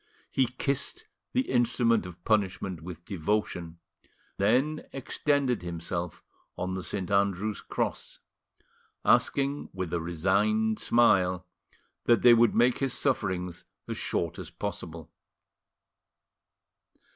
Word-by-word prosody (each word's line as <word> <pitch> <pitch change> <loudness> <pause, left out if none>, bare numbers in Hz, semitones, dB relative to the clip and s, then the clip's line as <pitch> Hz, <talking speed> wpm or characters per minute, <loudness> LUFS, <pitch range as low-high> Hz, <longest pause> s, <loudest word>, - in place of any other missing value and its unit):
He 130 -2 +2
kissed 135 +2 -2 0.3
the 255 - +2
instrument 120 - +2
of 85 -1 -12
punishment 95 -4 0
with 85 0 -9
devotion, 90 -3 -2 0.6
then 130 +10 +2
extended 135 -1 0
himself 85 0 -4 0.3
on 95 +1 -2
the 95 - -3
St. 95 +1 -3
Andrew's 100 +1 +1
cross, - - -3 0.9
asking 140 +1 +2
with 95 -3 -4
a 85 - 0
resigned 100 +6 +1
smile 95 -6 +3 0.6
that 120 -1 +4
they 120 - +9
would 115 0 +4
make 120 +1 +4
his 135 -2 0
sufferings 90 -9 -1 0.2
as - - -3
short - - -2
as - - -6
possible. 80 -1 -6
100 Hz, 110 wpm, -28 LUFS, 90-120 Hz, 0.9 s, they